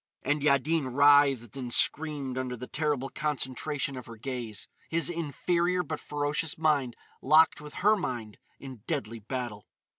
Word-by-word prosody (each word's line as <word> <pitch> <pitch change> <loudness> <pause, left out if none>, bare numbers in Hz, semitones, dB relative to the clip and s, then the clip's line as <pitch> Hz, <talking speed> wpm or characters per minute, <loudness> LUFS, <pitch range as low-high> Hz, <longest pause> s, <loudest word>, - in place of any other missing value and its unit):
And 145 +2 0
Yaddin 140 -1 +2
writhed 140 -5 +5
and 125 -3 -5
screamed 145 -2 +1
under 130 -1 -3
the 125 - -6
terrible 145 -2 -1
concentration 140 0 -2
of 125 -3 -8
her 115 - -9
gaze, 115 -3 -5 0.2
his 170 +1 +1
inferior 175 +3 0
but 155 -3 -5
ferocious 145 +1 -1
mind 145 -6 +1 0.3
locked 155 +2 +5
with 150 0 -10
her 215 +1 +7
mind 120 - -5 0.2
in 130 -2 -9
deadly 115 -8 -3
battle. 115 -2 -5
140 Hz, 145 wpm, -29 LUFS, 125-155 Hz, 0.3 s, her